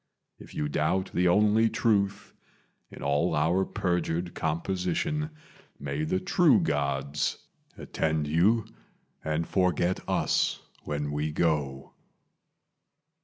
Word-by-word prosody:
If -, -, -13 dB
you 75 Hz, -, -1 dB
doubt 80 Hz, +6 st, 0 dB
the 90 Hz, 0 st, +2 dB
only 105 Hz, +4 st, +4 dB
truth 100 Hz, -4 st, 0 dB, 0.6 s
in -, -, -10 dB
all 75 Hz, +4 st, +1 dB
our 85 Hz, +6 st, +2 dB
perjured 85 Hz, -1 st, -2 dB
composition, 95 Hz, -, -1 dB, 0.5 s
May 70 Hz, +2 st, -3 dB
the 95 Hz, +4 st, 0 dB
True 150 Hz, -, +4 dB
Gods 70 Hz, -3 st, -1 dB, 0.4 s
attend 80 Hz, -1 st, -1 dB
you 100 Hz, +9 st, +3 dB, 0.6 s
and 80 Hz, +1 st, -1 dB
forget 90 Hz, -1 st, +1 dB
us -, -, +1 dB, 0.3 s
when 75 Hz, 0 st, -3 dB
we 75 Hz, +1 st, -2 dB
go." 75 Hz, -4 st, -1 dB
85 Hz, 105 wpm, -28 LUFS, 75-95 Hz, 0.6 s, only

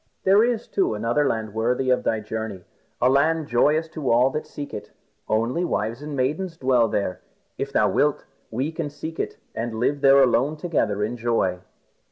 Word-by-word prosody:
There 195 Hz, +3 st, +5 dB
is, 235 Hz, -2 st, 0 dB
too, 190 Hz, -, 0 dB
another 120 Hz, +7 st, +1 dB
land 110 Hz, -4 st, -2 dB
worthy 125 Hz, +4 st, +1 dB
of 125 Hz, -, +2 dB
thy 110 Hz, -1 st, 0 dB
journey, 105 Hz, -3 st, -5 dB, 0.4 s
a 125 Hz, -, +3 dB
land 155 Hz, +4 st, +2 dB
joyous 150 Hz, +6 st, +2 dB
to 155 Hz, -5 st, -3 dB
all 125 Hz, +3 st, +4 dB
that 150 Hz, -, -4 dB
seek 145 Hz, -1 st, -7 dB
it. 105 Hz, -, -7 dB, 0.4 s
Only 115 Hz, +10 st, +1 dB
wives 115 Hz, -6 st, -2 dB
and 150 Hz, -1 st, -5 dB
maidens 155 Hz, +7 st, -1 dB
dwell 130 Hz, -4 st, +3 dB
there. 100 Hz, -3 st, -2 dB, 0.4 s
If -, -, -3 dB
thou -, -, +3 dB
wilt, -, -, +1 dB, 0.2 s
we 130 Hz, +7 st, -2 dB
can 160 Hz, -2 st, -4 dB
seek 160 Hz, +2 st, -7 dB
it -, -, -3 dB, 0.2 s
and 115 Hz, 0 st, -4 dB
live 140 Hz, +4 st, 0 dB
there 135 Hz, 0 st, +6 dB
alone 135 Hz, +4 st, +2 dB
together 150 Hz, -, 0 dB
in 115 Hz, +4 st, -2 dB
joy." 115 Hz, -6 st, 0 dB
130 Hz, 185 wpm, -24 LUFS, 115-150 Hz, 0.4 s, there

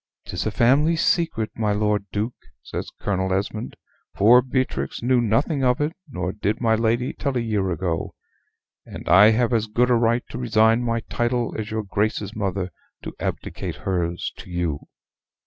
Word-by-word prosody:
"'Tis -, -, -3 dB
a -, -, -1 dB
family 135 Hz, +9 st, +3 dB
secret, 155 Hz, -, +1 dB
my 110 Hz, -2 st, 0 dB
Lord 105 Hz, -1 st, +1 dB
Duke," 110 Hz, +4 st, -2 dB, 0.3 s
says -, -, -5 dB
Colonel 95 Hz, -2 st, -1 dB
Esmond: 105 Hz, +4 st, -2 dB, 0.4 s
"poor 120 Hz, +5 st, +6 dB
Beatrix 130 Hz, -1 st, -2 dB
knew 125 Hz, 0 st, +3 dB
nothing 120 Hz, +6 st, +1 dB
of 125 Hz, -1 st, +3 dB
it; 150 Hz, +2 st, 0 dB, 0.2 s
nor 90 Hz, -8 st, -3 dB
did 105 Hz, +1 st, -2 dB
my 115 Hz, -2 st, +2 dB
lady 115 Hz, +3 st, +1 dB
till 140 Hz, -3 st, -2 dB
a -, -, +2 dB
year 105 Hz, -5 st, 0 dB
ago. 85 Hz, -2 st, -2 dB, 0.7 s
And -, -, -10 dB
I 95 Hz, +5 st, +8 dB
have 115 Hz, +2 st, +2 dB
as 110 Hz, -1 st, +1 dB
good 120 Hz, +4 st, +2 dB
a -, -, +6 dB
right 120 Hz, +1 st, +2 dB
to 120 Hz, -, -5 dB
resign 115 Hz, -1 st, +3 dB
my 115 Hz, -1 st, -1 dB
title 120 Hz, +1 st, -1 dB
as 110 Hz, -1 st, -4 dB
your 110 Hz, 0 st, -2 dB
Grace's 105 Hz, +1 st, -1 dB
mother 95 Hz, -3 st, -2 dB, 0.3 s
to -, -, -6 dB
abdicate -, -, -4 dB
hers 85 Hz, -2 st, -2 dB
to -, -, -11 dB
you." 85 Hz, -5 st, -2 dB
110 Hz, 170 wpm, -23 LUFS, 100-120 Hz, 0.7 s, I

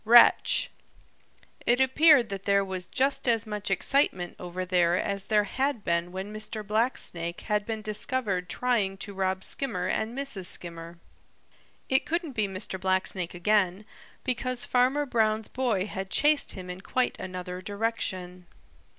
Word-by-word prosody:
Wretch!" 235 Hz, +2 st, +6 dB, 1.0 s
It 240 Hz, +1 st, +4 dB
appeared 265 Hz, -1 st, +5 dB
that 195 Hz, -1 st, -6 dB
there 200 Hz, 0 st, +3 dB
was 185 Hz, -2 st, -5 dB
just 275 Hz, 0 st, 0 dB
as 230 Hz, -2 st, +2 dB
much 210 Hz, -1 st, -4 dB
excitement 195 Hz, -3 st, +1 dB
over 180 Hz, +1 st, -5 dB
there 175 Hz, -1 st, +3 dB
as 200 Hz, 0 st, -2 dB
there 210 Hz, -2 st, +3 dB
had 265 Hz, +1 st, -1 dB
been 170 Hz, +1 st, 0 dB
when 190 Hz, +3 st, -6 dB
Mr. 215 Hz, 0 st, -5 dB
Blacksnake 200 Hz, -6 st, -1 dB
had 210 Hz, -1 st, -1 dB
been 220 Hz, -1 st, -4 dB
discovered 210 Hz, -4 st, -1 dB
trying 210 Hz, -4 st, 0 dB
to 200 Hz, +1 st, -7 dB
rob 190 Hz, 0 st, -1 dB
Skimmer 225 Hz, -10 st, -2 dB
and 220 Hz, +6 st, -2 dB
Mrs. 270 Hz, -10 st, -3 dB
Skimmer. 170 Hz, -1 st, -4 dB, 0.9 s
It 265 Hz, 0 st, +1 dB
couldn't 335 Hz, -2 st, -1 dB
be 215 Hz, -5 st, 0 dB
Mr. 190 Hz, 0 st, -3 dB
Blacksnake 185 Hz, -1 st, 0 dB
again, 195 Hz, +1 st, +1 dB, 0.4 s
because 255 Hz, 0 st, -1 dB
Farmer 260 Hz, +4 st, +2 dB
Brown's 220 Hz, -4 st, +1 dB
boy 235 Hz, -7 st, 0 dB
had 190 Hz, -2 st, -5 dB
chased 295 Hz, +5 st, +3 dB
him 185 Hz, -2 st, -8 dB
in 180 Hz, +1 st, -8 dB
quite 255 Hz, +5 st, 0 dB
another 180 Hz, 0 st, -6 dB
direction. 185 Hz, -4 st, -3 dB
205 Hz, 145 wpm, -27 LUFS, 185-240 Hz, 1.0 s, Wretch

